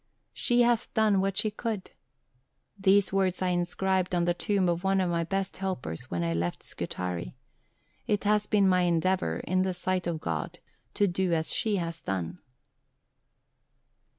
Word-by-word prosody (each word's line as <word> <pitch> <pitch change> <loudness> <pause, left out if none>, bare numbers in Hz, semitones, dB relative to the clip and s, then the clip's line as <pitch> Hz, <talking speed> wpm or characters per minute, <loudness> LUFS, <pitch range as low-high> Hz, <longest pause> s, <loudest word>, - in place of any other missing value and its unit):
'She 240 0 +3
hath 240 -1 +1
done 215 -3 +4
what 195 0 -1
she 215 - +1
could.' 215 -2 -4 0.8
These 195 0 +3
words 190 -2 +1
I 185 - 0
inscribed 180 +1 0
on 175 -1 +2
the 175 - +2
tomb 195 +1 +1
of 175 +1 0
one 195 0 +2
of 180 -2 +1
my 170 0 +1
best 195 +2 -2
helpers 185 - -4
when 85 -1 -1
I 85 0 0
left 85 +1 -2
Scutari. 90 -9 -4 0.7
It 205 -1 +1
has 210 0 +2
been 200 -2 +3
my 185 -1 +4
endeavour, 175 - +1
in 185 0 0
the 185 -1 0
sight 180 0 -1
of 165 -2 -2
God, 80 - -3 0.4
to 205 - +3
do 180 -1 0
as 160 -1 0
she 215 -2 +1
has 170 -3 -3
done." 90 -2 -3
185 Hz, 165 wpm, -28 LUFS, 170-195 Hz, 0.8 s, done